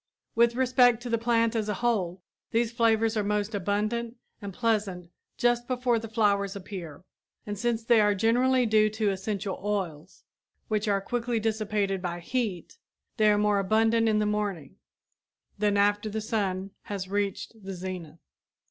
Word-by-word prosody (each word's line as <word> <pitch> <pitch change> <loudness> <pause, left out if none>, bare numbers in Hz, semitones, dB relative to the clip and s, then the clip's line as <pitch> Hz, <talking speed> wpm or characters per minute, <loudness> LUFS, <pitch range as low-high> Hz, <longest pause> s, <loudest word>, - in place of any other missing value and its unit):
With 235 0 +3
respect 250 -2 +4
to 245 - -5
the 230 - +2
plant 230 0 +2
as 215 -2 -1
a 210 - 0
whole, 190 -6 -1 0.3
these 230 0 +1
flavors 225 -1 +2
are 210 - +1
most 210 +1 -1
abundant 215 +4 -1 0.3
and 200 -1 -5
pleasant 200 -5 -1 0.3
just 240 0 +1
before 250 -2 +1
the 225 - -7
flowers 200 -3 +1
appear. 180 -6 -8 0.4
And 205 - -4
since 230 +2 -1
they 230 -1 +5
are 205 -1 +3
generally 245 +5 +3
due 215 -1 +4
to 215 -1 0
essential 195 0 -3
oils, 185 -5 -4 0.5
which 215 0 0
are 200 -1 +2
quickly 240 +2 -1
dissipated 210 -3 -1
by 175 -1 -3
heat, 220 - -3 0.4
they 215 -2 +5
are 205 - +4
more 210 -1 +2
abundant 225 +3 +3
in 215 - +2
the 210 - +1
morning 205 -8 -2 0.8
than 205 -1 +2
after 205 +1 +2
the 220 +1 -3
sun 195 -3 -2
has 195 -2 -4
reached 205 +2 -3
the 195 0 -6
zenith. 180 -4 -6
210 Hz, 160 wpm, -27 LUFS, 195-230 Hz, 0.8 s, they